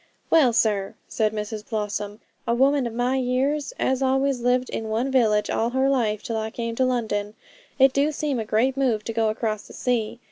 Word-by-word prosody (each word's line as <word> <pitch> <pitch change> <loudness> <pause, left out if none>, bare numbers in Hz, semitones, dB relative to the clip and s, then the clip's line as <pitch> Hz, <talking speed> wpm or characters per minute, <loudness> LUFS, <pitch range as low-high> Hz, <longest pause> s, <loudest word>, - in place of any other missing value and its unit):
'Well, 300 -7 +5
sir,' 210 -4 +1
said 215 -2 0
Mrs 210 0 -5
Blossom, 210 -1 -3 0.3
'a 235 - +2
woman 270 +1 +3
of 230 - -6
my 250 +2 +1
years, 265 - 0
as 260 0 0
always 270 0 +1
lived 250 +1 +1
in 225 - -3
one 235 +5 -1
village 215 -5 +3
all 230 - 0
her 265 +2 +1
life 225 -6 0
till 230 - -3
I 220 0 -2
came 230 0 -4
to 260 - +3
London, 215 -4 -1 0.4
it 270 -1 +5
do 285 +2 +2
seem 295 -4 -2
a - - -1
great 225 +5 +1
move 245 -6 0
to 230 - -4
go 225 -1 +1
across 215 -1 -3
the - - -13
sea. 235 -2 -1
235 Hz, 205 wpm, -24 LUFS, 220-265 Hz, 0.4 s, Well